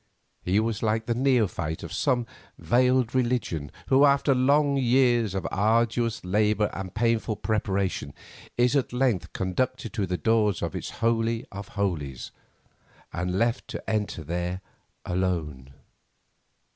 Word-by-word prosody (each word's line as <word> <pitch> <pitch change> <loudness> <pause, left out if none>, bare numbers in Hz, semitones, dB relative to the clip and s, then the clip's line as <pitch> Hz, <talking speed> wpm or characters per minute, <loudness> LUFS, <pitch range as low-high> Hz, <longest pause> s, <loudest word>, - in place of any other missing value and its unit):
He 95 +3 +1
was 110 -1 -1
like 110 0 0
the 120 - 0
neophyte 110 - 0
of 85 - -7
some 125 -4 +1 0.3
veiled 125 +7 +2
religion, 120 - -1 0.2
who, 135 +1 +5
after 140 0 +4
long 140 +3 +3
years 120 -5 +3
of 95 - -2
arduous 115 +1 +1
labour 105 +2 +1
and 95 -1 -6
painful 115 -1 +1
preparation, 100 -9 -2 0.4
is 125 +3 +3
at 135 -3 0
length 125 -7 0
conducted 115 +6 -2
to 105 -5 -1
the 90 0 -1
doors 105 +1 +1
of - - -3
its - - -4 0.2
holy 115 0 +1
of 100 0 -7
holies, 75 -11 -2 0.8
and 90 +2 -2
left 115 +3 0
to - - -7
enter 105 -6 -2
there 90 +3 -3 0.4
alone. 85 -8 -2
110 Hz, 135 wpm, -26 LUFS, 95-120 Hz, 0.8 s, who